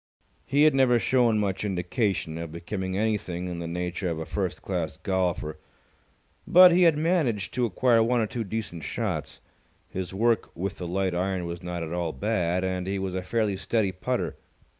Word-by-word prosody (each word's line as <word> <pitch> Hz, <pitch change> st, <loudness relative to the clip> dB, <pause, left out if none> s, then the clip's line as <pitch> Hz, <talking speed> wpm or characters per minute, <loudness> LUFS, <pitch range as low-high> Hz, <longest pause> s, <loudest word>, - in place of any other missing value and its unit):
He 140 Hz, +2 st, +3 dB
had 155 Hz, -1 st, +6 dB
never 130 Hz, -3 st, +4 dB
shown 120 Hz, -2 st, +3 dB
much 100 Hz, -2 st, -1 dB
indication 95 Hz, -3 st, -1 dB
of 85 Hz, -2 st, -5 dB
becoming 95 Hz, +3 st, -4 dB
anything 100 Hz, -5 st, -1 dB
in 90 Hz, -1 st, -4 dB
the 85 Hz, -, -4 dB
nature 90 Hz, +2 st, -3 dB
of 85 Hz, -, -2 dB
a 80 Hz, -, -4 dB
first 95 Hz, -1 st, -3 dB
class 85 Hz, -6 st, -3 dB
golfer, 90 Hz, -5 st, -1 dB, 0.9 s
but 180 Hz, +1 st, +9 dB
he 175 Hz, +2 st, +4 dB
had 150 Hz, -, -1 dB
managed 150 Hz, -, +1 dB
to 125 Hz, -2 st, +1 dB
acquire 115 Hz, +3 st, +3 dB
one 120 Hz, +2 st, +2 dB
or 110 Hz, -, +2 dB
two 115 Hz, +2 st, -3 dB
decent 100 Hz, -6 st, -5 dB
shots. -, -, -3 dB, 0.5 s
His 95 Hz, -1 st, -4 dB
work 115 Hz, +4 st, +1 dB
with 95 Hz, +3 st, -4 dB
the 90 Hz, -, -4 dB
light 95 Hz, +1 st, 0 dB
iron 90 Hz, 0 st, -1 dB
was 85 Hz, 0 st, -5 dB
not 90 Hz, -1 st, -4 dB
at 80 Hz, +1 st, -5 dB
all 85 Hz, -2 st, -2 dB
bad, 90 Hz, -4 st, 0 dB
and 95 Hz, -1 st, -2 dB
he 100 Hz, +1 st, -1 dB
was 95 Hz, -1 st, -3 dB
a 95 Hz, -, -2 dB
fairly 105 Hz, +1 st, 0 dB
steady 100 Hz, +1 st, 0 dB
putter. 95 Hz, -, -2 dB
95 Hz, 185 wpm, -26 LUFS, 90-115 Hz, 0.9 s, but